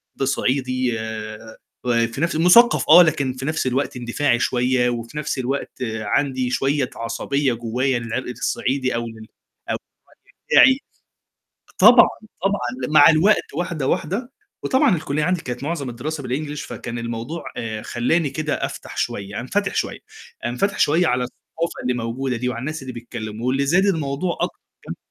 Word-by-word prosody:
ب 135 - -1
صعيدي 130 -3 0
آآ، 110 0 -7 0.3
وفي 115 -1 0
نفس 170 -1 0
الو 160 - +1
مُثقّف 235 +7 +6
آه، 170 +3 +10
لكن 140 -5 0
في 130 +1 -6
نفس 155 -2 -1
الوقت 130 +1 -1
اندفاعي 120 +1 0
شويّة، 125 0 +2
وفي 120 +3 -5
نفس 150 -1 -2
الوقت 130 +2 -2 0.3
عندي 130 +4 0
شويّة 135 0 0
عصبية 130 +4 -1
جوّاية 120 +3 -1
للعرق 120 +2 -4
الصعيدي 130 +1 -1
أو 120 0 -2
للع 110 -1 -8 0.7
بتاعي. 265 - +7 1.0
طبعًا، - - +8 0.3
طبعًا 125 -10 -1
ل - - -6
مع 155 +1 +8
الوقت 170 +7 +2
واحدة، 170 -6 -2
واحدة. 220 - -2 0.3
وطبعًا 260 -8 +3
الكُلّية 150 -1 -2
عندي 180 +1 +1
كانت 125 -2 -6
معظم 145 -3 -3
الدراسة 145 +6 -5
بالenglish 145 +4 -4
فكان 120 0 -6
الموضوع 115 +7 -5
آآ 110 -2 -4
خلّاني 140 +6 0
كده 155 +2 -2
أفتح - - -5
شوية 100 +1 -3
أنفتِح 195 +10 -1
شويّة، - - -2 0.5
انفتِح 125 +13 -1
شويّة 165 +4 +3
على 125 -3 +1
الثقافة 165 +6 -6
اللي 125 0 0
موجودة 125 +2 -2
دي 125 +2 -2
وعلى 120 -2 -3
الناس 155 +3 -4
اللي 130 -1 -6
بيتكلّموا، 115 -1 -6
واللي 135 +2 +1
زاد 180 +7 +3
الموضوع 165 -1 -1
أكتر - - -2 0.3
كمان - - -6
130 Hz, 155 wpm, -22 LUFS, 120-155 Hz, 1.0 s, آه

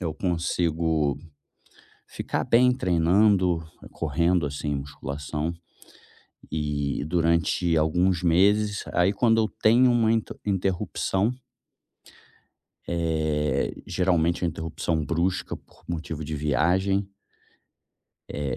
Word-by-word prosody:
eu 80 -4 -3
consigo 80 -4 0 0.9
ficar - - -3
bem 125 +2 +4
treinando, 90 -3 +2 0.3
correndo, 85 +1 0
assim, 70 +1 -3
musculação 70 +3 -4 1.0
e 75 -2 -2
durante 85 +1 +1
alguns 90 +3 +2
meses 100 +4 +3
aí 90 +2 +3
quando 115 +2 +3
eu 110 - +1 0.2
tenho 120 +3 +5
uma 115 -2 +3
inter 115 -1 -1
interrupção 95 +2 0 1.6
eh, 80 -4 0
geralmente 85 -1 +1
é 85 - +2
interrupção 80 0 -3
brusca 85 +5 -1
por - - -24
motivo 80 -2 -4
de 75 +1 -4
viagem 95 +7 +1 1.2
eh, 70 -2 -3
85 Hz, 95 wpm, -25 LUFS, 75-95 Hz, 1.6 s, tenho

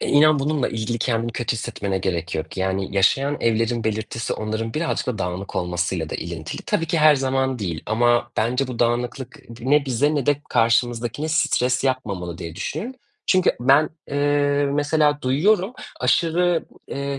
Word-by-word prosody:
Eee, - - -2
inan 150 +1 +5
bununla 145 -1 0
ilgili 115 +1 -3
kendini 115 -1 -1
kötü 120 -1 -1
hissetmene 100 -3 -3
gerek 90 -2 -2
yok 80 +3 -4
yani, 95 +1 -2
yaşayan 135 +9 +3
evlerin 115 0 +1
belirtisi 110 +1 -2
onların 110 +1 -3
birazcık 165 +2 -1
da 125 -5 -2
dağınık 90 +1 -4
olmasıyla 90 -2 -2
da - - -4
ilintili. 85 -2 -5
Tabii 165 - -1
ki 165 0 0
her 155 0 +7
zaman 130 -1 0
değil 85 -6 -4
ama 120 +2 +2
bence 125 +4 +1
bu 125 -2 -6
dağınıklık 120 +3 -1
ı 140 - -19 0.2
ne 140 +4 +3
bize 140 +5 +1
ne 145 -4 -1
de 145 -1 +2
karşımızdakine 120 +4 +1
stres 130 -5 +1
yapmamalı 100 -10 -2
diye 85 -2 -7
düşün. 225 - -5 0.3
Çünkü 185 -1 +4
ben, 140 +5 +4 0.2
eee, 145 0 +2
mesela 145 0 +2
duyuyorum, 185 - +2 0.3
aşırı, 175 0 +2 0.2
eee, 140 0 -3
125 Hz, 160 wpm, -22 LUFS, 110-145 Hz, 0.3 s, her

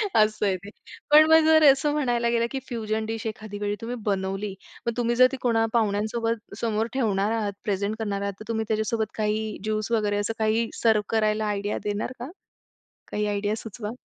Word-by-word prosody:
असं 215 -1 +3
आहे 190 -2 +2
ते. 200 - -8 0.4
पण 305 +1 +9
मग 320 -1 +7
जर 315 0 +6
असं 290 +2 0
म्हणायला 240 -5 +1
गेलं, 235 0 +2
की 270 - -2
फ्युजन 220 -2 -2
डिश 225 +1 -4
तुम्ही 220 - -1
एखाद्या 215 -1 -8
वेळी 205 0 -1
तुम्ही 240 +2 -4
बनवली, 195 0 -1 0.3
मग 235 - +1
तुम्ही 240 0 +1
जर 255 +1 +7
ती 270 - -4
कोणा 225 -2 +2
पाहुण्यांसोबत 220 0 -1
समोर 225 0 0
ठेवणार 210 -5 +1
आहात, 210 -3 -1
प्रेझेंट 205 0 -1
करणार 200 -2 -2
आहात, 200 0 -2
तर 215 - -9
तुम्ही 220 -1 -1
त्याच्यासोबत 220 0 -1
काही 215 0 -1
ज्यूस 215 +1 -2
वगैरे 210 -2 +1
असं 205 +2 -1
काही 220 +1 +1
सर्व्ह 215 -2 +4
करायला 215 0 +1
आयडिया 205 0 -2
देणार 210 +4 -2
का? 250 +5 -6 0.8
काही 210 0 -1
आयडिया 205 +1 -1
सुचवा. 215 -1 -6
215 Hz, 190 wpm, -25 LUFS, 210-230 Hz, 0.8 s, पण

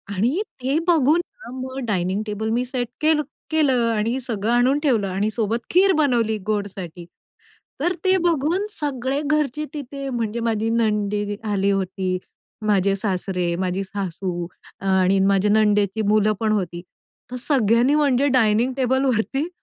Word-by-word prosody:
आणि 245 - +1 0.2
ते 270 +4 +1
बघून 320 0 +4 0.2
हां, 245 - -8
मग 260 +1 -6
डायनिंग 190 +1 0
टेबल 215 +1 -3
मी 245 +2 0
सेट 250 -2 -3
केलं 310 0 +3 0.3
केलं 265 -7 +2
आणि 230 +4 0
सगळं 225 -3 -2
आणून 250 +4 +3
ठेवलं. 245 -10 +1
आणि 195 +3 -1
सोबत 225 +1 -1
खीर 380 +2 +5
बनवली 235 -7 +2
गोडसाठी. 190 -5 -4 0.8
तर 350 +3 +1
ते 375 0 +4
बघून 340 +2 +1
सगळे 275 -1 -2
घरचे 300 0 0
तिथे 275 -1 -6
म्हणजे 235 -2 -2
माझी 225 -1 0
नणदी 210 -2 0 0.2
आली 200 0 +1
होती, 190 -1 -1 0.5
माझे 200 -2 +2
सासरे, 185 -3 -1
माझी 185 +1 -1
सासू 185 -2 -4 0.3
आणि 190 0 +3
माझ्या 195 +1 +3
नणंदेची 210 -1 +2
मुलं 215 0 +3
पण 220 -1 +1
होती. 175 -5 -2 0.5
तर - - -4
सगळ्यांनी 245 0 +3
म्हणजे 285 -2 +3
डायनिंग 240 0 +3
टेबलवरती 260 - +1
225 Hz, 140 wpm, -22 LUFS, 200-270 Hz, 0.8 s, खीर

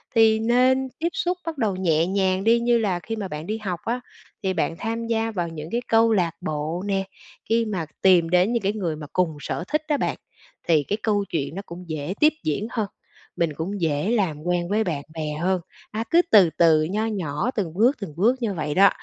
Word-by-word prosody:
thì 220 -1 +5
nên 255 +3 +3
tiếp 335 +2 +1
xúc 360 +1 -1
bắt 325 -3 -4
đầu 215 -6 0
nhẹ 165 -3 +2
nhàng 190 0 +1
đi 235 +1 +5
như 235 0 +3
là 190 -5 0
khi 225 +6 -5
mà 205 -3 -4
bạn 150 0 -6
đi 215 +1 -2
học 185 -6 -4
á, 245 +2 -1 0.4
thì 190 -1 +1
bạn 165 - -1
tham 230 +2 -3
gia 225 0 0
vào 175 -4 -2
những 160 -1 -7
cái 240 +1 0
câu 225 0 +4
lạc 175 -5 +2
bộ 155 +4 -3
nè, 195 -1 +1 0.5
khi 230 0 +3
mà 185 -7 -2 0.2
tìm 175 -3 +5
đến 180 +6 +3
những 230 -4 0
cái 200 +2 +1
người 175 -7 -2
mà 150 -1 -8
cùng 165 -5 +1
sở 170 - -3
thích 305 0 0
á 295 - +2
bạn, - - -1 0.5
thì 155 -3 +4
cái 205 +9 -2
câu 205 -2 +1
chuyện 145 0 -2
nó 195 - -4
cũng 175 +2 -9
dễ 155 +3 -3
tiếp 305 +1 +6
diễn 155 +9 -1
hơn, 220 -4 -1 0.5
mình 165 -3 +1
cũng 190 +4 -4
dễ 155 +5 0
làm 170 -10 0
quen 175 0 0
với 215 +2 +2
bạn 155 -8 -3
bè 155 -1 -3
hơn. 185 0 +1 0.3
À, 220 +1 -2
cứ 340 +1 +6
từ 195 -6 +7
từ, 160 -2 +5
nho 205 +7 -1
nhỏ 190 - -2
từng 180 -7 -2
bước, 240 +9 +3
từng 165 -7 -6
bước 230 +8 +4
như 215 -4 0
vậy 150 -4 -3
đó, 195 +1 +7
195 Hz, 230 wpm, -24 LUFS, 165-225 Hz, 0.5 s, từ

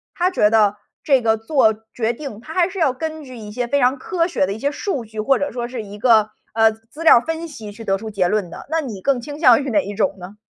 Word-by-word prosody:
他 360 +1 +1
觉 210 - +3
得 210 -2 +3 0.3
这 270 -4 +3
个 220 -1 +3
做 225 0 +2 0.2
决 230 0 0
定， 260 -4 -8
他 310 +7 -10
还 360 0 +2
是 385 0 -7
要 290 -6 +3
根 315 +4 -5
据 255 -1 -10
一 215 -3 -9
些 245 +2 -3
非 280 +3 +1
常 255 +2 +3
科 335 +5 -1
学 265 - +1
的 195 - -3
一 - - -7
些 280 +4 0
数 290 - -3
据， 220 0 -9
或 255 +5 +3
者 285 - -2
说 240 0 -4
是 245 -2 -6
一 205 0 -10
个， 220 -2 +4 0.2
呃， 225 0 +4
资 225 +8 -11
料 330 - +8
儿 - - +2
分 325 +5 -4
析 225 -8 -9
去 225 +2 -10
得 195 -3 0
出 220 +2 -7
结 190 -4 0
论 210 -3 0
的， - - -10
那 325 - +2
你 230 -11 -6
更 275 +1 +1
倾 290 +4 -8
向 255 -5 +6
于 275 - -4
哪 205 -3 +3
一 205 - -6
种 210 - 0
呢？ 190 +3 -11
235 Hz, 305 characters per minute, -20 LUFS, 215-285 Hz, 0.3 s, 料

